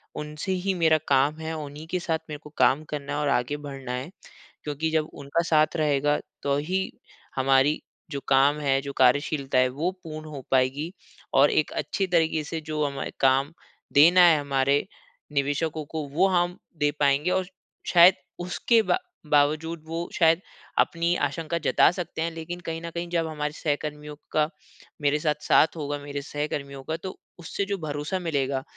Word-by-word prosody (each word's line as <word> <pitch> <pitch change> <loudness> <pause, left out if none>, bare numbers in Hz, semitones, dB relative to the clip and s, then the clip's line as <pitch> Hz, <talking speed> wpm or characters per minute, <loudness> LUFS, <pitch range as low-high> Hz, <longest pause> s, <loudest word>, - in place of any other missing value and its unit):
उनसे 150 +5 -4
ही 190 +1 0
मेरा 160 -3 +4
काम 140 +3 +3
है, 160 0 -4
उन्हीं 150 +1 -7
के 180 - 0
साथ 165 -2 -1
मेरे 150 -1 -6
को 150 - -11
काम 150 +4 +4
करना 145 -1 -4
है 150 - -1
और 145 -1 0
आगे 125 +3 0
बढ़ना 135 -3 -7
है। 130 +6 -4 0.5
क्योंकि 150 +2 -2
जब 155 -1 0
उनका 140 +4 -1
साथ 155 -1 +3
रहेगा, 145 -1 +2 0.2
तो 140 0 +1
ही 185 +6 -1 0.4
हमारी 135 +2 +3 0.3
जो 140 - -3
काम 140 +2 +4
है, 135 -2 +2
जो 140 0 -6
कार्यशीलता 135 +1 +2
है, 130 0 +5
वो 155 +8 -1
पूर्ण 155 -1 -7
हो 140 -3 -7
पाएगी 135 +6 +1 0.4
और 140 +2 +5
एक 155 - +1
अच्छी 195 -1 -2
तरीके 160 -3 +2
से 160 +1 -5
जो 155 -1 -2
हमें 140 -1 -3
अ, - - -4
काम 135 +3 +3 0.4
देना 170 +5 +7
है 160 -3 +6
हमारे 140 0 +1 0.5
निवेशकों 150 +2 -1
को, 155 +1 -4
वो 170 +8 +2
हम 175 -1 +1 0.2
दे 145 0 +2
पाएँगे 145 +4 +2
और 185 -1 +1 0.5
शायद 175 +1 +9 0.3
उसके 220 +6 +2
बा 360 - +1 0.3
बावजूद, 155 +3 +2
वो 165 +1 -4
शायद 165 +1 +4 0.4
अपनी 170 +1 +2
आशंका 165 0 -3
जता - - +5
सकते 175 -3 -5
हैं। 165 0 -1
लेकिन 165 +2 -6
कहीं 165 -1 -5
न 170 - -5
कहीं 170 +1 -4
जब 165 -2 0
हमारे 150 -1 -3
सहकर्मियों 150 -1 -3 0.2
का 155 0 +2 0.5
मेरे 145 +1 +2
साथ 150 -1 +1
साथ 160 +2 +4
होगा 145 -1 -3
मेरे 145 0 -5
सहकर्मियों 140 -1 -4
का, 160 +4 -3
तो 185 +2 -7 0.2
उससे 185 +4 -3
जो 200 0 -2
भरोसा 150 +3 -3
मिलेगा, 140 -5 -1
150 Hz, 175 wpm, -26 LUFS, 140-165 Hz, 0.5 s, शायद